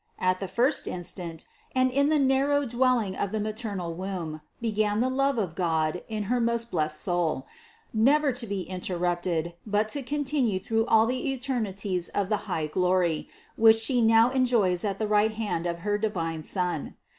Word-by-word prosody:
At 185 Hz, 0 st, +1 dB
the 195 Hz, -, -4 dB
first 240 Hz, -, +1 dB
instant, 175 Hz, -2 st, -5 dB, 0.3 s
and 255 Hz, 0 st, +3 dB
in 280 Hz, +3 st, +3 dB
the 310 Hz, -, +3 dB
narrow 280 Hz, +1 st, +2 dB
dwelling 240 Hz, -5 st, +1 dB
of 200 Hz, -, -2 dB
the 220 Hz, -, -1 dB
ma 215 Hz, +1 st, -1 dB
ternal 200 Hz, -6 st, -4 dB
womb, 175 Hz, -4 st, -5 dB, 0.2 s
began 215 Hz, -2 st, 0 dB
the 255 Hz, +2 st, +1 dB
love 275 Hz, 0 st, +1 dB
of 190 Hz, -7 st, -1 dB
God 165 Hz, -1 st, 0 dB
in 215 Hz, -1 st, -2 dB
her 240 Hz, +4 st, 0 dB
most 235 Hz, 0 st, 0 dB
blessed 155 Hz, -3 st, 0 dB
soul, 170 Hz, -7 st, 0 dB, 0.5 s
never 275 Hz, +6 st, +4 dB
to 245 Hz, -2 st, -3 dB
be 200 Hz, -1 st, -2 dB
interrupted, 175 Hz, -2 st, -2 dB
but 210 Hz, 0 st, 0 dB
to 285 Hz, -, -1 dB
continue 270 Hz, -6 st, 0 dB
through 225 Hz, +4 st, 0 dB
all 220 Hz, 0 st, +5 dB
the 255 Hz, +4 st, -1 dB
eternities 205 Hz, -9 st, -2 dB
of 200 Hz, -1 st, -1 dB
that 210 Hz, -, +2 dB
high 160 Hz, -4 st, -1 dB
glory, 180 Hz, 0 st, +1 dB, 0.3 s
which 225 Hz, 0 st, +7 dB
She 240 Hz, +2 st, +2 dB
now 225 Hz, +2 st, +5 dB
enjoys 235 Hz, -9 st, +2 dB
at 200 Hz, -2 st, -1 dB
the 215 Hz, -, -1 dB
right 210 Hz, +1 st, +3 dB
hand 205 Hz, -6 st, -2 dB
of 170 Hz, 0 st, -4 dB
her 205 Hz, 0 st, +1 dB
divine 165 Hz, -7 st, -2 dB
Son. 175 Hz, -1 st, -2 dB
210 Hz, 180 wpm, -27 LUFS, 180-240 Hz, 0.5 s, which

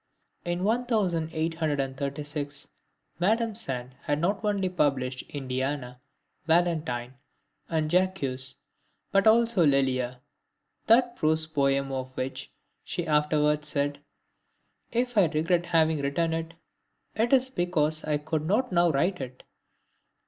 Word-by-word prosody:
In 175 Hz, +1 st, -2 dB
1836 155 Hz, -, -1 dB, 0.5 s
Madame 220 Hz, +5 st, +2 dB
Sand 130 Hz, -, -3 dB
had 145 Hz, 0 st, -1 dB
not 195 Hz, +6 st, 0 dB
only 200 Hz, -3 st, +1 dB
published 135 Hz, -7 st, 0 dB
INDIANA, 130 Hz, -2 st, -3 dB, 0.5 s
VALENTINE, 155 Hz, -8 st, +1 dB, 0.6 s
and 160 Hz, -2 st, 0 dB
JACQUES, 150 Hz, -8 st, 0 dB, 0.5 s
but 195 Hz, +1 st, +3 dB
also 225 Hz, -4 st, +5 dB
LELIA, 130 Hz, -3 st, +1 dB, 0.7 s
that 240 Hz, +1 st, +4 dB
prose 160 Hz, -3 st, +3 dB
poem 140 Hz, -3 st, +1 dB
of 130 Hz, -1 st, -5 dB
which 130 Hz, +1 st, -4 dB, 0.3 s
she 175 Hz, -2 st, -3 dB
afterwards 150 Hz, -1 st, +2 dB
said: 145 Hz, -1 st, -1 dB, 0.9 s
"If 245 Hz, -2 st, +1 dB
I 195 Hz, -, +6 dB
regret 165 Hz, +3 st, 0 dB
having 160 Hz, -2 st, +3 dB
written 160 Hz, +4 st, 0 dB
it, 165 Hz, 0 st, -4 dB, 0.6 s
it 225 Hz, +3 st, 0 dB
is 260 Hz, -1 st, +3 dB
because 160 Hz, -, 0 dB
I 150 Hz, -1 st, 0 dB
could 155 Hz, +1 st, -3 dB
not 225 Hz, +6 st, +1 dB
now 175 Hz, -1 st, +4 dB
write 165 Hz, +4 st, 0 dB
it. 130 Hz, -1 st, -8 dB
155 Hz, 110 wpm, -27 LUFS, 140-180 Hz, 0.9 s, I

